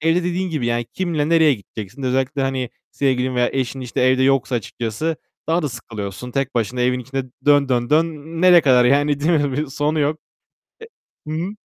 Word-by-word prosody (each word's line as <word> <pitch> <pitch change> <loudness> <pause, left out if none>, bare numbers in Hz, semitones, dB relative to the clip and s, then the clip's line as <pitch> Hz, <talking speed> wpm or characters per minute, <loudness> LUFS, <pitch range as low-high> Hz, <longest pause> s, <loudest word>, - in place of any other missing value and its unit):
evde 165 +3 +2
dediğin 180 +1 -1
gibi 150 -7 -2
yani 120 0 0
kimle 165 -5 -1
nereye 160 -3 +5
gideceksin? 105 +3 -9
Özellikle 130 +2 0
hani, 130 -2 -2 0.2
sevgilin 130 -2 0
veya 125 0 +2
eşin 130 0 -2
işte 125 -2 -3
evde 130 +1 +3
yoksa 135 -1 +2
açıkçası 120 +7 -3 0.3
daha 165 +1 +2
da 150 - -1
sıkılıyorsun. 115 -1 -7
Tek 135 +1 -2
başına 120 +1 -1
evin 125 +1 +2
içinde 135 +1 -4 0.2
dön, 145 -1 +4
dön, 120 -1 0
dön. 160 +2 +4 0.4
Nereye 180 -2 +8
kadar 125 -4 +4
yani 145 +2 +2
değil 155 +4 +1
mi? 145 -4 +2
Bir 150 +3 -1
sonu 150 +3 -1
yok. 150 +2 0 1.1
E - - -4
Hı - - -2
hı. 175 +4 -2
135 Hz, 190 wpm, -20 LUFS, 125-155 Hz, 1.1 s, Nereye